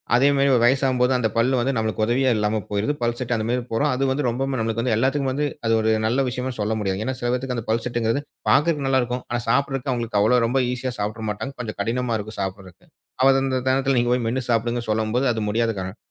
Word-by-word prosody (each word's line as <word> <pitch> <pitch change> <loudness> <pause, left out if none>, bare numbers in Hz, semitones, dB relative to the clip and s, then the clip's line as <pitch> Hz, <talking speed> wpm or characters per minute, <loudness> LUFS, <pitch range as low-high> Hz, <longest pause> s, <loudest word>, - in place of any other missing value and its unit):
அதே 130 +3 +4
மாதிரி 140 0 +3 0.2
வயசாகும் 130 0 +2
போது, 125 +1 +3
அந்தப் 110 -3 -1
பல்லு 125 +3 +3
வந்து 135 - +1
நமக்கு 110 -1 -1
உதவியா 130 +2 +2
இல்லாம 105 0 0
போயிடுது. 105 +8 0
பல் 120 0 0
செட்டு 125 -2 -1
அந்த 110 - -2
மாதிரி 125 0 0
போறோம். 145 +6 +1
அது 135 +2 0
வந்து 135 -1 0
ரொம்பவுமே 130 +2 -2
நமக்கு 115 +1 0
எல்லாத்துக்கும் 135 +2 +1
வந்து 145 +2 0 0.2
அது 115 - +3
ஒரு 110 - +2 0.2
நல்ல 130 +4 +1
விஷயமா 125 +1 -3
சொல்ல 105 +1 0
முடியாது. 95 0 -1
ஏன்னா, 130 - -2
சில 120 - 0
பேத்துக்கு 125 0 -2
அந்தப் 115 - -6
பல் 115 +1 0
செட்டுங்கறது, 120 +2 0 0.3
பாக்கறதுக்கு 145 -1 +2
நல்லா 130 -1 +3
இருக்கும். 125 +1 -4
ஆனா 120 0 -1
சாப்பிடுறதுக்கு 135 +1 0
அவங்களுக்கு 115 -3 -1
அவ்வளவு 115 +3 +4
ரொம்ப 130 +3 +1
ஈஸியா 125 0 -3
சாப்பிட்டுற 110 +2 -3
மாட்டாங்க. 135 +6 -6
கொஞ்சம் 110 -3 -6
கடினமா 120 0 -1
இருக்கு 110 +1 -8
சாப்பிடுறதுக்கு. 95 -2 -7 0.4
அது 135 - +2
அந்த 130 -1 -1
நேரத்துல 135 0 +2
நீங்கப் 120 0 +2
போய் 125 -2 -2
மென்னு 125 +2 -1
சாப்பிடுங்கன்னு 120 0 -1
சொல்லும்போது, 110 +5 0
அது 110 - -3
முடியாத 115 +1 +1
காரணம். 95 +3 -6
120 Hz, 225 wpm, -23 LUFS, 110-130 Hz, 0.4 s, அதே